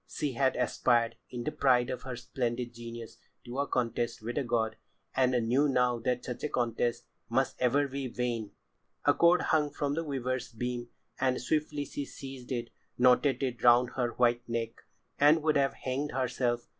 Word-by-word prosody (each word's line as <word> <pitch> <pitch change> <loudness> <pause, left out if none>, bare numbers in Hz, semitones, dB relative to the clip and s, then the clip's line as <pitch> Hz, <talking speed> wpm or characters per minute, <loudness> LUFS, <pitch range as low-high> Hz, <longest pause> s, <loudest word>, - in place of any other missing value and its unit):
She 150 -3 -2
had 130 +1 +1
aspired, 120 -2 +2
in 120 -1 -5
the 150 - -2
pride 125 -4 +3
of 125 -1 -4
her 130 -1 -5
splendid 120 0 -3
genius, 115 -1 -9 0.3
to 125 +2 -5
a 140 - +1
contest 120 -1 -1
with 120 +2 -4
a - - 0
god, 115 -2 0 0.4
and 125 -3 +2
knew 140 +5 +3
now 125 -2 +2
that 125 +1 -1
such 125 - -5
a 150 - 0
contest 120 -1 -1 0.2
must 135 +3 +1
ever 140 +3 +3
be 135 0 -4
vain. 120 -3 -2 0.6
A - - +6
cord 170 +1 +4
hung 150 -2 +2
from 145 0 -2
the 165 +2 -1
weaver's 130 -4 -3
beam, 120 +1 -3 0.3
and 130 -1 +1
swiftly 150 +1 -1
she 140 +1 -5
seized 135 -2 -9
it, 120 -2 -3 0.3
knotted 125 +2 +4
it 125 -3 -3
round 120 +1 +6
her 125 -3 -1
white 120 -1 +3
neck, 115 -1 -1 0.5
and 150 +2 +5
would 155 -1 +3
have 140 -1 +2
hanged 135 +3 -3
herself. 125 -2 -1
125 Hz, 180 wpm, -30 LUFS, 120-135 Hz, 0.6 s, A